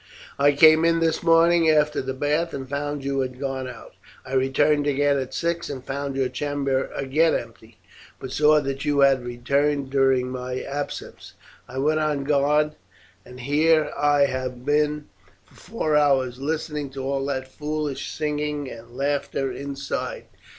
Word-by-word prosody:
I 145 Hz, +1 st, +5 dB
came 155 Hz, +2 st, +6 dB
in 165 Hz, 0 st, +3 dB
this 165 Hz, -1 st, +1 dB
morning 165 Hz, 0 st, +4 dB
after 150 Hz, -1 st, +2 dB
the 130 Hz, 0 st, -4 dB
bath 150 Hz, +5 st, -1 dB
and 135 Hz, -1 st, -6 dB
found 145 Hz, +1 st, -3 dB
you 135 Hz, 0 st, -1 dB
had 130 Hz, -1 st, -3 dB
gone 135 Hz, -2 st, -3 dB
out. 120 Hz, -3 st, -11 dB, 0.3 s
I 130 Hz, -, -8 dB
returned 145 Hz, +3 st, +2 dB
again 145 Hz, 0 st, +2 dB
at 130 Hz, -1 st, -5 dB
six 170 Hz, 0 st, -2 dB
and 130 Hz, -2 st, -7 dB
found 140 Hz, 0 st, -4 dB
your 135 Hz, -1 st, +1 dB
chamber 140 Hz, 0 st, -2 dB
again 150 Hz, +5 st, +2 dB
empty, 115 Hz, -1 st, -8 dB, 0.4 s
but 130 Hz, -, -7 dB
saw 150 Hz, +2 st, +4 dB
that 135 Hz, -1 st, -4 dB
you 145 Hz, -2 st, +1 dB
had 135 Hz, -2 st, +4 dB
returned 140 Hz, +3 st, -1 dB
during 135 Hz, -2 st, +2 dB
my 125 Hz, 0 st, -4 dB
absence; 145 Hz, +1 st, -6 dB, 0.3 s
I 130 Hz, -, -9 dB
went 155 Hz, +3 st, +1 dB
on 150 Hz, -2 st, 0 dB
guard, 150 Hz, +1 st, +2 dB, 0.6 s
and 125 Hz, 0 st, -11 dB
here 150 Hz, +3 st, +2 dB
have -, -, -11 dB, 0.5 s
I -, -, -1 dB
been 145 Hz, +4 st, -1 dB, 0.4 s
for -, -, -26 dB
four 155 Hz, -9 st, -2 dB
hours 135 Hz, -4 st, +2 dB
listening 150 Hz, 0 st, -3 dB
to 135 Hz, -, -4 dB
all 135 Hz, 0 st, -1 dB
that 130 Hz, -2 st, -3 dB
foolish 150 Hz, 0 st, -4 dB
singing 150 Hz, -2 st, -3 dB
and 115 Hz, +2 st, -12 dB
laughter 140 Hz, -1 st, -1 dB
inside. 140 Hz, 0 st, -5 dB
140 Hz, 160 wpm, -24 LUFS, 130-150 Hz, 0.6 s, came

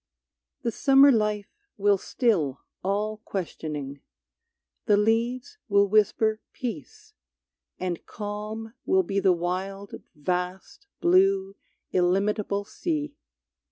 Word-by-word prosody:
The 235 Hz, -, 0 dB
summer 275 Hz, +4 st, +6 dB
life 210 Hz, -3 st, 0 dB, 0.2 s
will 200 Hz, -1 st, +3 dB
still 175 Hz, -, 0 dB, 0.2 s
all 210 Hz, +3 st, -1 dB
questioning, 150 Hz, -9 st, -5 dB, 0.9 s
The 205 Hz, -, +5 dB
leaves 235 Hz, -, 0 dB
will 200 Hz, 0 st, +4 dB
whisper 215 Hz, +1 st, +2 dB
peace, 430 Hz, -, -7 dB, 0.7 s
and 180 Hz, -2 st, -3 dB
calm 215 Hz, +2 st, -6 dB
will 190 Hz, 0 st, +3 dB
be 195 Hz, +3 st, -1 dB
The 190 Hz, -1 st, +4 dB
wild, 185 Hz, +3 st, -3 dB
vast, 180 Hz, -, -3 dB
blue, 385 Hz, +2 st, +3 dB, 0.4 s
illimitable 200 Hz, +3 st, +1 dB
sea. 305 Hz, -, -3 dB
210 Hz, 95 wpm, -26 LUFS, 190-240 Hz, 0.9 s, summer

